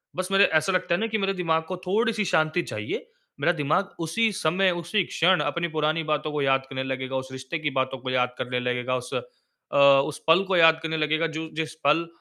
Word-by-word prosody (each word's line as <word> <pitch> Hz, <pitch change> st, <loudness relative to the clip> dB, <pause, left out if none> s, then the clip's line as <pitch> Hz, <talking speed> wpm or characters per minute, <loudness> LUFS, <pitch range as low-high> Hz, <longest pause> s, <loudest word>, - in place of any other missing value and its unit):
बस, 185 Hz, 0 st, -2 dB
मेरे 195 Hz, +1 st, +5 dB
ऐसा 155 Hz, +4 st, +1 dB
लगता 180 Hz, -1 st, 0 dB
है -, -, -2 dB
ना 225 Hz, -, 0 dB
कि 220 Hz, 0 st, -1 dB
मेरे 195 Hz, -1 st, 0 dB
दिमाग 165 Hz, -3 st, 0 dB
को 185 Hz, -1 st, -4 dB
थोड़ी-सी 215 Hz, +2 st, +1 dB
शांति 155 Hz, 0 st, +1 dB
चाहिए, 105 Hz, -, -5 dB, 0.3 s
मेरा 175 Hz, -, +3 dB
दिमाग 160 Hz, +6 st, -1 dB
उसी 210 Hz, +8 st, 0 dB
समय, 185 Hz, +1 st, +1 dB
उसी 175 Hz, +3 st, -1 dB
क्षण 180 Hz, +3 st, +2 dB
अपनी 170 Hz, 0 st, -1 dB
पुरानी 155 Hz, +1 st, 0 dB
बातों 155 Hz, 0 st, -1 dB
को 150 Hz, -1 st, -2 dB
याद 135 Hz, -1 st, +2 dB
करने 130 Hz, -1 st, -3 dB
लगेगा, 130 Hz, 0 st, -4 dB
उस 130 Hz, 0 st, -3 dB
रिश्ते 130 Hz, +5 st, -5 dB
की 150 Hz, -1 st, -1 dB
बातों 130 Hz, 0 st, -1 dB
को 130 Hz, +1 st, -6 dB
याद 125 Hz, -1 st, 0 dB
करने 125 Hz, 0 st, -2 dB
लगेगा, 125 Hz, +1 st, -1 dB
उस 125 Hz, -, -6 dB, 0.6 s
अ, -, -, 0 dB, 0.2 s
उस 145 Hz, -, -4 dB
पल 165 Hz, +4 st, +6 dB
को 190 Hz, -1 st, -1 dB
याद 160 Hz, -1 st, +6 dB
करने 160 Hz, 0 st, -2 dB
लगेगा 155 Hz, +1 st, +1 dB
जो 160 Hz, 0 st, -5 dB
जिस 160 Hz, 0 st, -3 dB
पल 165 Hz, +3 st, +3 dB
160 Hz, 220 wpm, -25 LUFS, 135-180 Hz, 0.6 s, पल